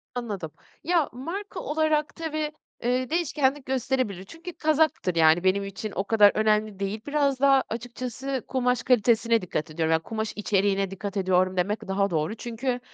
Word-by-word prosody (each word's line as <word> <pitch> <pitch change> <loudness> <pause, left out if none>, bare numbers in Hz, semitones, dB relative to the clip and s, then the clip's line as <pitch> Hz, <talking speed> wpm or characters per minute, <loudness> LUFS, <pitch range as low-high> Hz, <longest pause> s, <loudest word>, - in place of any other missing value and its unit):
Anladım. 205 -10 -4 0.3
Ya, 335 -3 +2
marka 340 +12 -6
olarak 305 -1 0
tabii, 310 -2 -3 0.3
eee, 250 +2 0
değişkenlik 290 -4 0
gösterebilir. 255 -7 -1
Çünkü 330 - -10
kazaktır, 310 - +1
yani, 160 +2 +5
benim 190 +1 +2
için 200 +2 -6
o 195 - 0
kadar 210 -1 +5
önemli 215 -2 +1
değil. 200 +2 -3
Biraz 285 -2 +1
daha 275 -1 +5
açıkçası 245 +2 -4
kumaş 250 -2 0
kalitesine 230 -1 +3
dikkat 155 -3 -4
ediyorum, 160 0 0
ya, 160 - +4
kumaş 220 +5 -4
içeriğine 195 -2 +1
dikkat 200 +1 -5
ediyorum 185 -1 +2
demek 195 +3 -1
daha 200 +1 +1
doğru. 160 +5 -1
Çünkü 245 +2 -3
230 Hz, 155 wpm, -26 LUFS, 195-270 Hz, 0.3 s, yani